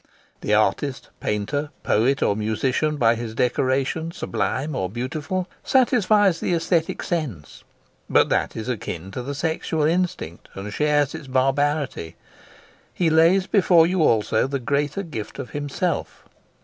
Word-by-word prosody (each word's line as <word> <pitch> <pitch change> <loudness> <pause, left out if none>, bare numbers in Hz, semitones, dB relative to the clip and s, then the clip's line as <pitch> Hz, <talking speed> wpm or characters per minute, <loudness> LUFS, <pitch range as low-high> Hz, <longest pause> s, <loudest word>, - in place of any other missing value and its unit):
The 105 - +1
artist, 110 +6 0
painter, 145 +9 -2
poet, 130 +6 +2
or 100 - +2
musician, 130 +8 0
by 115 -4 +4
his 115 -1 -5
decoration, 130 +6 0
sublime 145 -3 -2
or 95 -5 -1
beautiful, 145 - -3 0.2
satisfies 215 -8 +3
the 175 - 0
aesthetic 165 0 0
sense; 130 - -4 0.5
but - - +4
that - - 0
is 110 +1 -5
akin 95 -7 -4
to 125 - -4
the 140 +3 -5
sexual 160 +1 -1
instinct, 170 - -1
and 100 +1 -6
shares 150 0 +2
its 160 -3 -8
barbarity: 135 - 0 0.8
he 170 -3 +1
lays 170 +4 +5
before 180 -5 +5
you 180 +1 +1
also 110 -3 +2
the 140 +1 -2
greater 140 +9 -1
gift 115 - -7
of - - -6
himself. 145 +5 -3
145 Hz, 135 wpm, -23 LUFS, 115-165 Hz, 0.8 s, lays